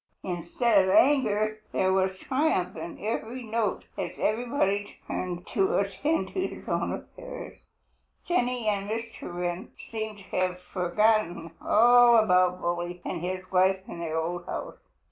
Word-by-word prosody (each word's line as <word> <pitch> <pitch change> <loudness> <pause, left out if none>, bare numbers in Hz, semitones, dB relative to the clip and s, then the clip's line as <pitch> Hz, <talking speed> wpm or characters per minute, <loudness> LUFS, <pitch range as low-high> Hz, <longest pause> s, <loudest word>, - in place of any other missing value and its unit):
Instead 190 +4 +2
of - - 0
anger 215 -6 +3
there 190 0 +2
was 190 0 +1
triumph 260 - 0
in 165 +1 -6
every 230 +3 -3
note 220 -2 -1 0.2
as - - -4
everybody 215 -3 0
returned 180 -1 -4
to 195 -4 +1
attend 200 - 0
to 375 0 -1
his - - -10
own - - 0
affairs. - - -8 0.7
Jenny 250 -9 0
and 200 -1 0
Mr. 230 -3 -5
Wren 175 0 -3 0.2
seemed 220 -2 -4
to 200 - -13
have 185 0 0
forgotten 180 -1 +1
all 240 +1 +6
about 180 -4 +4
Bully 175 +1 -2
and 175 - -3
his 185 +1 -4
wife 190 +1 +3
in - - -7
their 160 -1 -2
old 175 +2 -3
house. - - -5
195 Hz, 145 wpm, -27 LUFS, 180-230 Hz, 0.7 s, all